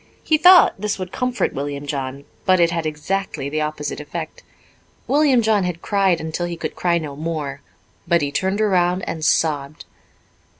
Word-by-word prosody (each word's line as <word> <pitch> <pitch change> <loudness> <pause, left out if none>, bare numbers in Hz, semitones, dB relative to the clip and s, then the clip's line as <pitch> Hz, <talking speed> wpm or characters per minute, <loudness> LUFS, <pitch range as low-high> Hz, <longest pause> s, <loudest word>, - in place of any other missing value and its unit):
He 315 - +3
thought 355 - +7
this 210 -1 -1
would 185 -1 -6
comfort 250 -1 -1
William 140 +1 -4
John, 140 -1 -4 0.2
but 185 -1 +3
it 170 -1 +4
had 165 -2 -2
exactly 155 -2 -3
the 155 +1 -2
opposite 150 -1 -3
effect. 155 +2 -7 0.6
William 280 -5 +3
John 215 -3 +2
had 180 -2 -4
cried 195 -4 +2
until 160 +2 -3
he 170 -1 -5
could - - -4
cry 175 -1 +1
no 150 -4 -5
more, 150 -3 -4 0.5
but 170 -2 +3
he 140 - -2
turned 190 +8 -1
around 180 -3 +2
and 160 - -4
sobbed. 150 -2 0
170 Hz, 170 wpm, -21 LUFS, 150-190 Hz, 0.6 s, thought